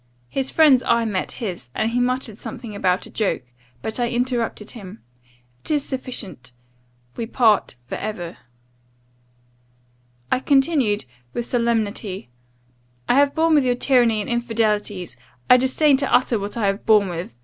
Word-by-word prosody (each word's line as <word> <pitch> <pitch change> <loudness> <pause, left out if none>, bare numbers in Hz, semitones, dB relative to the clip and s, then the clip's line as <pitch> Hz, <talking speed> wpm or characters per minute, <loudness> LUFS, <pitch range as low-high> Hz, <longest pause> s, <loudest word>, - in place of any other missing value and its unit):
His 270 -1 -2
friend's 295 -6 +5
eye 235 -2 +2
met 200 -4 -2
his, 180 - -6
and 220 +1 0
he 245 - 0
muttered 250 -3 -1
something 230 0 -8
about 185 -2 0
a - - -13
joke 210 - -1 0.4
But 220 +2 -3
I 240 -1 +1
interrupted 240 -3 -2
him 205 -3 -11 0.6
'It - - -7
is 295 -2 +1
sufficient 235 - -6 0.6
We 230 - -4
part 220 - +2
for - - -5
ever.' 180 -5 -5 1.9
"I - - +3
continued, 270 - +2 0.3
with 240 - -2
solemnity, 220 - -1 0.8
'I - - +3
have 280 +2 +3
borne 325 0 +3
with 295 -3 +5
your 250 -1 +2
tyranny 240 -4 +3
and - - -6
infidelities. 215 - -1 0.3
I 250 - +10
disdain 265 +3 +3
to 275 0 -1
utter 245 -2 +3
what 200 +3 -5
I 220 - 0
have 195 +1 0
borne 210 -3 +5
with. 170 -7 -6
230 Hz, 150 wpm, -22 LUFS, 205-255 Hz, 1.9 s, I